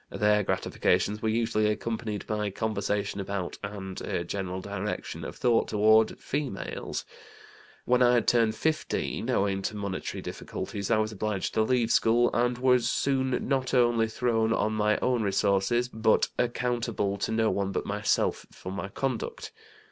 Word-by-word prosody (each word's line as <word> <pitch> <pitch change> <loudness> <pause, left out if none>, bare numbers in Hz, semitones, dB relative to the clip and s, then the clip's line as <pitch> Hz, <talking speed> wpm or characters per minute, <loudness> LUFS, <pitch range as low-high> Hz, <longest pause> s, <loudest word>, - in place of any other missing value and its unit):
Their 105 0 +2
gratifications 105 +1 0
were 110 - 0
usually 110 -1 +1
accompanied 110 0 -3
by 105 -1 -1
conversation 100 -1 -2
about, 95 -2 -4
and 100 -2 -6
a 85 - -2
general 95 -1 -4
direction 100 +1 -4
of - - -6
thought 120 -2 +2
toward, 110 +1 +4
females. 140 -8 -4 0.8
When 125 0 +3
I 125 0 +5
had 120 - +1
turned 115 -2 +3
15, 160 +4 -1
owing 95 0 +1
to 105 - -3
monetary 100 -2 -4
difficulties 100 -1 -5
I 115 - +4
was 110 0 0
obliged 105 -2 -2
to 110 - +2
leave 120 0 +2
school, 120 +2 +4
and 120 +1 +1
was 125 -1 +3
soon 130 -2 0
not 130 -1 0
only 120 -2 +3
thrown 115 -1 0
on 110 0 0
my 105 0 +2
own 125 -2 +2
resources, 100 +4 +1
but 110 -2 +2
accountable 120 -4 -1
to 100 - -2
no 110 0 +2
one 100 -1 -1
but - - -2
myself 105 +1 0
for 95 - -8
my 95 0 -4
conduct. 130 +2 -3
110 Hz, 155 wpm, -28 LUFS, 100-120 Hz, 0.8 s, I